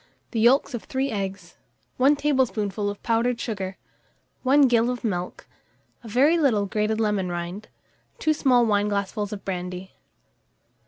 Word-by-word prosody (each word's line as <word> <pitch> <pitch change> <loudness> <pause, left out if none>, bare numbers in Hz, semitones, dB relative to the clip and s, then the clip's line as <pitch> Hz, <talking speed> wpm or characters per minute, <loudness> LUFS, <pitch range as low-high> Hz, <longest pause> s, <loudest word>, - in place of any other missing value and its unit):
The 230 - -1
yolks 255 +4 +4
of 240 - -5
3 265 0 -2
eggs, 195 -4 -5 0.4
1 275 +3 +5
tablespoonful 230 -8 0
of 205 - -8
powdered 230 +1 +1
sugar, 195 -5 -4 0.6
1 275 +3 +4
gill 235 -1 +3
of 250 -1 -4
milk, 180 -5 -3 0.6
a - - -10
very 280 +10 +3
little 230 -9 +2
grated 210 +2 -1
lemon 210 -4 0
rind, 175 +4 -5 0.5
2 310 - +1
small 250 -5 +3
wineglassfuls 205 -1 0
of 205 -2 -7
brandy. 180 0 -5
215 Hz, 140 wpm, -24 LUFS, 195-250 Hz, 0.6 s, 1